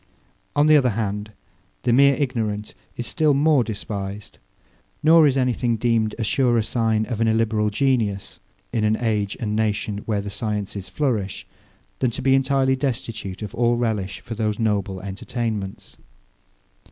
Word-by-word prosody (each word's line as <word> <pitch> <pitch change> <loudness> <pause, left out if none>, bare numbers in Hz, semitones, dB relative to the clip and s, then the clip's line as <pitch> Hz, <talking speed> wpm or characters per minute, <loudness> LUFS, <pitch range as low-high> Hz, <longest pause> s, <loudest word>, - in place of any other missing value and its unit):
On 145 - +4
the 155 0 +6
other 130 -3 +3
hand, 105 -1 -3 0.5
the 120 - +2
mere 140 +2 +6
ignorant 110 -7 -2 0.2
is 120 - -3
still 155 0 +2
more 145 -2 +4
despised; 100 -2 -6 0.6
nor 160 0 +7
is 135 -1 +1
any 125 -2 +2
thing 120 -1 0
deemed 115 -1 +1
a 115 - -2
surer 120 0 +2
sign 110 -1 0
of 115 -2 -4
an 115 - +3
illiberal 110 -1 +2
genius 105 -4 0 0.3
in 115 -3 +1
an 110 0 +3
age 105 -4 -1
and 105 -2 -2
nation 105 -1 -1
where 105 -3 0
the 100 0 -6
sciences 100 -3 -4
flourish, 110 -5 -2 0.5
than 130 - +2
to 115 - -5
be 135 - +4
entirely 135 0 +2
destitute 110 -7 -4
of 105 - -6
all 120 0 +2
relish 100 -5 -2
for 115 - -7
those 110 -2 -1
noble 100 -4 -1
entertainments. 100 +1 -5
110 Hz, 155 wpm, -23 LUFS, 105-125 Hz, 0.6 s, nor